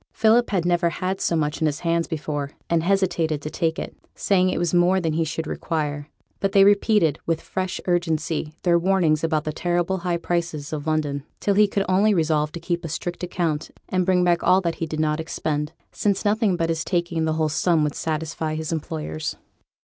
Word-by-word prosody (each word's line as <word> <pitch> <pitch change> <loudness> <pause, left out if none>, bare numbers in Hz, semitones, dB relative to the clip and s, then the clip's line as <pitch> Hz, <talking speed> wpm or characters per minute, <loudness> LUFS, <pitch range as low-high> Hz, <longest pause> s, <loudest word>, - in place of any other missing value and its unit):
Philip 230 +2 +4
had 185 -4 0
never 175 -1 +2
had 185 +3 -3
so 170 - +1
much 150 0 -1
in 160 - +3
his 150 +1 -2
hands 170 -1 +1
before, 145 -3 -3 0.2
and 170 -1 +3
hesitated 175 -4 +1
to 155 - -5
take 165 -2 -1
it, - - -5 0.2
saying 185 -2 +2
it - - -1
was 175 0 0
more 180 +2 +4
than 165 -3 -1
he 165 +1 +1
should 160 +1 -3
require; 150 -2 -3 0.3
but 195 -1 -1
they 195 - +7
repeated, 200 -6 +3
with 165 -1 +1
fresh 185 -1 -3
urgency, 165 -3 0
their 170 -1 +4
warnings 170 -4 +2
about 160 -2 +1
the 155 - -3
terrible 175 +3 0
high 175 -1 -1
prices 170 -4 -3
of 150 0 -4
London, 145 -3 -1 0.2
till 200 - +1
he 210 +1 +5
could 200 0 -1
only 200 +3 +3
resolve 155 -2 +1
to 170 - -5
keep 170 0 -2
a 165 - -4
strict 175 +3 -4
account, 170 -4 -1 0.2
and 185 -1 +1
bring 180 0 +3
back 175 -1 +3
all 185 - +5
that 170 -3 -1
he 165 - 0
did 155 0 -4
not 155 0 +1
expend, 150 -2 -2 0.2
since 200 -1 0
nothing 210 -2 +2
but 165 -1 -1
his 160 -1 0
taking 170 -3 -1
the 160 - +1
whole 155 0 +1
sum 160 +1 +2
would 150 -1 0
satisfy 155 0 -3
his 160 0 -4
employers. 80 - -4
165 Hz, 210 wpm, -23 LUFS, 155-185 Hz, 0.3 s, they